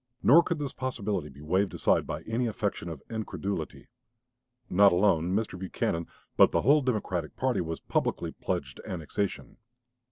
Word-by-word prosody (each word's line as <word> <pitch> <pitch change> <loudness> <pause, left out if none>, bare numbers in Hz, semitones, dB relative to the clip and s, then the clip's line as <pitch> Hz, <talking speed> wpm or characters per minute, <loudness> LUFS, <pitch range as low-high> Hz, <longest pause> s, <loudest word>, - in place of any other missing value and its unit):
Nor 155 +7 +8
could 170 -1 -2
this 145 -2 -4
possibility 105 - -3
be 70 +2 -13
waved 95 +5 +1
aside - - +2
by 75 +2 -4
any 115 +4 -1
affectation 105 -5 -2
of 80 -4 -8
incredulity. 100 -6 -4 0.8
Not 100 +2 +6
alone 90 -1 +2
Mr. 105 -4 -2
Buchanan 85 -3 -2 0.3
but - - +6
the - - +2
whole 145 +4 +5
Democratic 95 - -2
party 130 -2 0
was 80 -1 -4
publicly - - -1
pledged - - -4
to - - -10
annexation. 95 +3 -3
100 Hz, 155 wpm, -28 LUFS, 85-115 Hz, 0.8 s, Nor